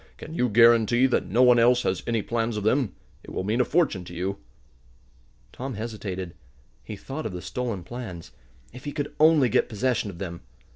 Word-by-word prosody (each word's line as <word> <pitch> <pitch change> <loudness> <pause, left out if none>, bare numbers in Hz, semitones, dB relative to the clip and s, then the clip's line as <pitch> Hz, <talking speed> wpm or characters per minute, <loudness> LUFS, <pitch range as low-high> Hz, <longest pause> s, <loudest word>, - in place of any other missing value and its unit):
"Can 160 - -9
you 125 -7 +1
guarantee 115 +2 +5
that 125 -7 +1
no 115 +8 +3
one 125 -1 +6
else 120 +1 +4
has 95 - -1
any 115 -3 0
plans 115 -1 -1
of 105 - -3
them? 110 -2 +1 0.3
It - - -12
will - - -3
mean 110 +6 +1
a - - +4
fortune 150 - +1
to 85 - -10
you." 95 +3 -3 1.1
Tom 130 -1 -5
hesitated. 100 -5 -5 0.5
He 110 - -7
thought 135 +7 -5
of 100 - -8
the 90 - -6
stolen 115 -1 -4
plans. 95 - -8 0.4
If 125 +3 -11
he 145 - -4
could 145 -1 -4
only 155 -4 +5
get 110 - +1
possession 120 -1 -1
of 90 - -9
them! 85 -2 -6
115 Hz, 195 wpm, -25 LUFS, 95-125 Hz, 1.1 s, one